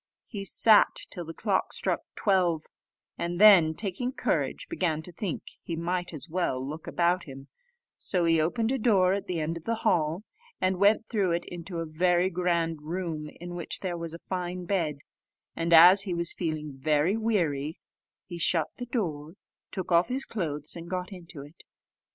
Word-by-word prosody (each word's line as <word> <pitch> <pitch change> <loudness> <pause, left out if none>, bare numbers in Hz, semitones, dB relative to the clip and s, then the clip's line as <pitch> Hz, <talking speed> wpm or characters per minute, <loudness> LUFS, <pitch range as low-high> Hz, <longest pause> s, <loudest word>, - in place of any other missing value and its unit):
He 200 -3 -6
sat 215 +2 +5 0.2
till 175 -2 -6
the 165 - -7
clock 200 -4 0
struck - - -1
twelve, 180 -6 +1 0.5
and 175 +1 -2
then, 185 -7 +7
taking 215 +7 -3
courage, - - -1
began 165 - -1
to 180 - -6
think 175 0 -4 0.2
he 170 - -5
might 175 +2 -2
as 155 0 -7
well 155 -7 -1
look 155 +3 -7
about 175 +1 +1
him: 135 -1 -11 0.5
so 180 -3 0
he 165 -1 +4
opened 225 +9 0
a 265 - 0
door 195 -5 +4
at 200 - -3
the 180 -2 -2
end 160 +2 -2
of 165 - -11
the 230 - 0
hall, 165 +2 +1 0.4
and 185 -1 0
went 210 +2 +4
through 200 -7 +1
it 170 +1 -2
into 175 0 -7
a 165 - -2
very 175 +3 +2
grand 170 -3 0
room, 160 -1 -4
in 175 +1 -7
which 175 -1 -4
there 185 -3 -2
was 165 -1 -5
a 170 - -13
fine 180 -1 -4
bed; 165 -7 -1 0.5
and 165 +1 -2
as 175 +4 +9
he 190 -3 -2
was 170 0 +2
feeling 155 -4 -3
very 150 +7 +1
weary, 165 -10 0 0.5
he 175 -2 -8
shut 165 -2 +2
the 245 - -6
door, 160 - -3 0.4
took 185 -2 -5
off 170 +1 +4
his 260 +2 -2
clothes, 150 -8 -4
and 170 0 -8
got 180 +1 -3
into 170 -5 -10
it. 145 +4 -15
175 Hz, 180 wpm, -28 LUFS, 160-190 Hz, 0.5 s, as